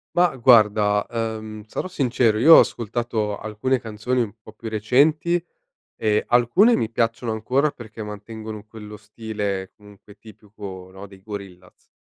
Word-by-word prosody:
Ma 175 -5 +3
guarda, 105 -4 +4
uhm, 110 -2 -5
sarò 185 - -4
sincero. 125 -8 +1
Io 160 +7 +9
ho - - +10
ascoltato 110 -2 -1
alcune 110 +5 -2
canzoni 115 +3 -2
un 110 -2 -3
po' 110 - -14
più 110 +1 -8
recenti. 150 +10 +2 0.6
E, 105 -1 +2
alcune 150 - +4
mi 110 - -1
piacciono 115 0 -1
ancora, 130 +7 0
perché 110 -1 -10
mantengono 105 +1 -8
quello 105 -1 -11
stile 105 -2 -5
comunque, 105 0 -18
tipico, 100 -3 -11
no, 95 +2 -10
dei 95 -1 -16
Gorillaz. 100 -4 -11
110 Hz, 140 wpm, -22 LUFS, 105-120 Hz, 0.6 s, ho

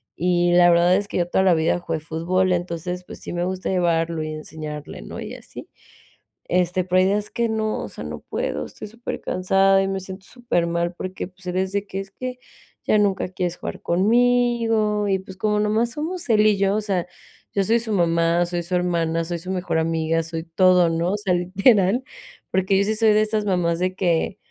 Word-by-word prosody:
y 175 0 +2
la 175 0 +6
verdad 175 +1 +4
es 205 +1 -1
que - - -4
yo 175 - +1
toda 190 - +2
la 185 - +5
vida 160 +1 +1
jugué 165 -2 -3
fútbol, 175 +4 0
entonces, 180 0 -3
pues, - - -10
sí - - -6
me 175 0 -1
gusta 185 0 -3
llevarlo 170 -3 +1
y 155 0 -4
enseñarle, 155 -1 -7
¿no? - - -8
Y - - -7
así. - - -11 0.8
Este, 180 +1 +1
pero 185 0 +2
hay 185 - +4
días 205 +1 -1
que 235 -1 0
no, 220 -1 -1
o - - -6
sea, - - -8
no - - -6
puedo, - - -3
estoy - - -9
súper 230 +3 -6
cansada 195 +1 +3
y 195 - -1
me 195 0 -2
siento 190 0 -8
súper 235 -9 -1
mal 170 +1 -1
porque, 185 +1 -5
pues, 185 0 -20
el 180 0 -2
es 190 0 0
de 200 0 -1
que: 195 - -4
"Es 195 0 -11
que 255 +3 -6 0.5
ya - - +3
nunca 200 -3 +1
quieres 180 -1 -3
jugar - - -6
conmigo" 225 +1 +2
y 195 -1 +2
pues, 190 0 -11
como 210 +1 +1
nomás 215 +3 +1
somos 320 +3 -4
él 215 -2 +4
y 210 - +4
yo, 195 0 +2
o 215 - 0
sea, 190 -4 -1 0.5
yo 200 - +3
soy 230 +4 +3
su 225 -2 -3
mamá, 170 -1 +2
soy 175 0 -2
su 180 +2 -2
hermana, 165 -2 0
soy 170 0 -3
su 180 +3 -9
mejor 180 -3 -1
amiga, 165 0 0
soy 165 0 -5
todo, 180 +1 +4
¿no? 165 +3 0
O - - 0
sea, 200 -3 0
literal, 195 +5 +3 0.5
porque 190 +1 +2
yo 195 - +3
sí 215 - 0
soy 220 -1 +4
de 210 - +4
estas 215 -1 0
mamás 175 -4 +1
de 185 +1 -1
que, 175 -1 0
185 Hz, 220 wpm, -22 LUFS, 175-210 Hz, 0.8 s, la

